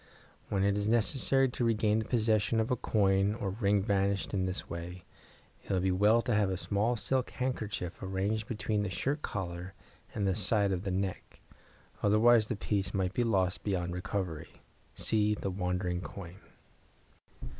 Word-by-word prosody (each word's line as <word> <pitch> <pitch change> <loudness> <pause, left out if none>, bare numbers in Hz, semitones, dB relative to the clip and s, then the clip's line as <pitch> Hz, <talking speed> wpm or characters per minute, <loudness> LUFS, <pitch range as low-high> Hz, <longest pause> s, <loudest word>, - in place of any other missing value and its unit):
When 95 -1 +1
it 100 0 +2
is 100 0 -1
necessary 130 +4 +3
to 125 - -3
regain 110 -1 +2
possession 110 -1 +1
of 110 +2 0
a - - +3
coin 100 -2 +2
or 100 -4 -3
ring 100 -1 +1
vanished 100 0 0
in 95 -2 0
this 95 - -3
way, 85 +1 -7 0.6
it - - -7
will 95 - +2
be 95 +1 +1
well 105 +5 +4
to 120 - 0
have 105 -2 +2
a 95 - -1
small 105 +5 0
silk 130 +3 -1
handkerchief 110 -8 -3
arranged 100 +3 -2
between 110 -3 -1
the 105 - -2
shirt 140 - -2
collar 90 -3 -5 0.4
and 100 - 0
the 95 - +2
side 100 0 +2
of 95 +1 -2
the - - -1
neck, 95 0 -3 0.6
otherwise 110 +2 +5
the 120 - -2
piece 100 -2 -2
might 95 -1 0
be 125 - 0
lost 95 -5 +1
beyond 90 -3 -1
recovery. 90 -3 -4 0.5
(See 105 -1 +2
"The 100 -1 -3
Wandering 90 -1 -2
Coin".) 90 -1 -9
100 Hz, 165 wpm, -31 LUFS, 95-110 Hz, 0.6 s, otherwise